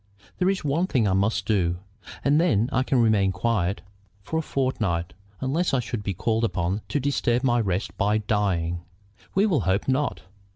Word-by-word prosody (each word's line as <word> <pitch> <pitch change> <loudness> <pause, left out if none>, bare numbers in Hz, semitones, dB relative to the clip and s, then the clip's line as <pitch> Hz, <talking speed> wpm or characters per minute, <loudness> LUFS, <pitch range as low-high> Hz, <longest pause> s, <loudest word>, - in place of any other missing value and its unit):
There 185 0 +3
is 195 -4 -1
one 155 +6 +1
thing 120 - +2
I 95 - +2
must 100 +4 +1
do, 90 -5 +1 0.5
and 145 +3 +4
then 120 - +2
I 130 - +3
can 130 -2 +2
remain 100 -4 +3
quiet 95 -1 -1 0.4
for 160 - -2
a - - 0
fortnight, 110 - -1 0.3
unless 145 +4 +1
I - - +2
should 120 -2 -4
be 100 -2 -3
called 110 +4 0
upon 95 -2 -1
to 145 - 0
disturb 130 -3 0
my 120 -2 +3
rest 95 -1 -2
by 105 +1 +2
dying." 95 -6 0 0.5
"We 195 +2 +4
will 180 -9 +2
hope 95 +1 0
not." 135 +2 0
115 Hz, 180 wpm, -25 LUFS, 95-135 Hz, 0.5 s, and